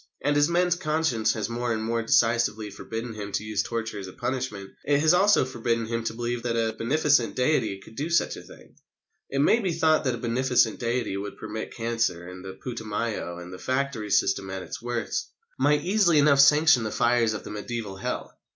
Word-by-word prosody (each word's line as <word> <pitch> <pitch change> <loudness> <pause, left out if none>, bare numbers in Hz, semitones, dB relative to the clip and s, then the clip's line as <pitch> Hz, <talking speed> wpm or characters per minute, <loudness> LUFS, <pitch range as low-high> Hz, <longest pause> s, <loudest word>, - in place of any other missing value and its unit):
And 145 +1 +2
as 145 +2 +4
man's 175 +1 +2
conscience 155 -9 0
has 110 -3 -2
more 120 +1 -2
and 110 -1 -1
more 115 +1 0
decisively 115 -2 +2
forbidden 115 +3 -6
him 105 -1 -6
to 105 - -1
use 110 -2 -1
torture 115 -1 -4
as 95 - -7
a 95 - -10
punishment, 120 -6 -4
it 140 0 +2
has 155 +2 +4
also 195 -4 +4
forbidden 115 -2 -1
him 115 0 -3
to 110 - -2
believe 120 0 -2
that 120 -1 -2
a 110 -1 0
beneficent 140 +1 +2
Deity 125 -7 +1
could 110 - -15
do 150 +6 -3
such 170 - +2
a - - -9
thing. - - -16 0.6
It 140 - 0
may 225 - +4
be 190 -6 -1
thought 160 -1 +3
that 130 -2 +1
a - - -7
beneficent 120 0 +1
Deity 120 -2 -1
who 100 0 -3
could 100 - -8
permit 110 0 -6
cancer 115 -7 -1
and 90 0 -9
the 95 0 -7
Putumayo 110 -6 -3
and 90 +1 -9
the 90 - -9
factory 130 -4 -2
system 95 -1 +1
at 95 -1 -5
its 90 - -7
worst, 120 -1 -3 0.3
might 145 +2 +3
easily 190 -4 +3
enough 145 -1 +5
sanction 150 -1 +6
the 110 - -2
fires 120 0 +2
of - - -6
the - - -8
mediæval 105 -2 -5
Hell. - - -4
115 Hz, 210 wpm, -26 LUFS, 110-140 Hz, 0.6 s, sanction